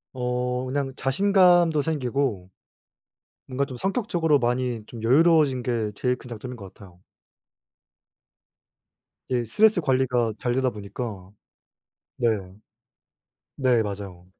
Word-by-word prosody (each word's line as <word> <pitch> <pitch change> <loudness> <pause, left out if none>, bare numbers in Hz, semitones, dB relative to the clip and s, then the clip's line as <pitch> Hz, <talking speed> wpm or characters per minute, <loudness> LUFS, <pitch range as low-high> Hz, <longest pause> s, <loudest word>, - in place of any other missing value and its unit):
어 125 0 -2
그냥 135 +1 -2
자신감도 175 +1 +3
생기고 130 - -2 1.0
뭔가 135 +2 -1
좀 135 -2 -8
성격적으로 175 - +1
많이 125 -1 -1
좀 115 -2 -9
여유로워진게 130 -5 +3
제일 125 +2 0
큰 125 - -14
장점인 125 +2 -7
것 100 -4 -11
같아요. 90 -3 -16 2.3
네. 120 -2 0
스트레스 210 - +3
관리가 130 -5 +1
잘 120 -1 -1
되다 130 0 +1
보니까. 100 -2 -7 0.9
네 120 - +1 1.3
네. 125 -4 +3
맞아요. 100 -4 -7
125 Hz, 235 characters per minute, -25 LUFS, 115-140 Hz, 2.3 s, 자신감도